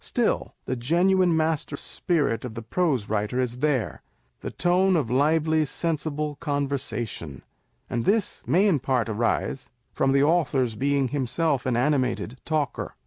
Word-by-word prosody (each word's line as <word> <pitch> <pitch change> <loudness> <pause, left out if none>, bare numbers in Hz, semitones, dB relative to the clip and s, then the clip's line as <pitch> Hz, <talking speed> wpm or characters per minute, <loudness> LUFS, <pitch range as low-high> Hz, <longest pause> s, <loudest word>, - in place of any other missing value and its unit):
Still - - -1
the 130 - -2
genuine 175 +7 +2
master 155 -2 -1
spirit 145 -10 -1
of 120 -3 -6
the 115 - -6
prose 135 - 0
writer 105 +3 -1
is 125 -1 -2
there; 140 -5 0 0.4
the - - -5
tone 185 +2 +2
of 135 -8 0
lively 155 +3 +2
sensible 150 -1 -2
conversation; 135 - -3 0.4
and 120 - -2
this 205 - +1
may 175 - +4
in 180 -8 +3
part 125 -3 0
arise 115 +4 -1 0.2
from 135 - +1
the 140 +1 +4
author's 145 -7 +2
being 140 +3 0
himself 140 +1 0
an 125 - +1
animated 130 -2 0
talker. 150 -5 -2
140 Hz, 140 wpm, -25 LUFS, 125-160 Hz, 0.4 s, may